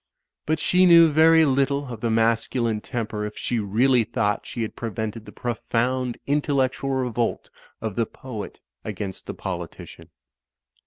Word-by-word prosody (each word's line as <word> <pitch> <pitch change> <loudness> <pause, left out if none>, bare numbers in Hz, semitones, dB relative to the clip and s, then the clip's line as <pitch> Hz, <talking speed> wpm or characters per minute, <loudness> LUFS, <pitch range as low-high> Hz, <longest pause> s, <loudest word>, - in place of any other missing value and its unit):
But 155 +1 +2
she 180 +4 +4
knew 170 -2 +8
very 160 +1 +6
little 140 -1 0
of 110 - -9
the 115 - 0
masculine 115 0 +1
temper 110 -4 -4
if 105 0 -6
she 120 - -1
really 115 +5 +3
thought 110 -2 -1
she 120 - -3
had 110 - -5
pre 115 - -4
vented 110 +2 -5
the 105 - -11
profotind 120 +2 -1
intellectual 140 -2 0
revolt 125 -3 -1 0.3
of 110 -3 -4
the 115 -2 0
poet 110 -6 -8 0.2
against 95 -3 -6
the - - -5
politician. - - -7
120 Hz, 150 wpm, -24 LUFS, 110-135 Hz, 0.3 s, knew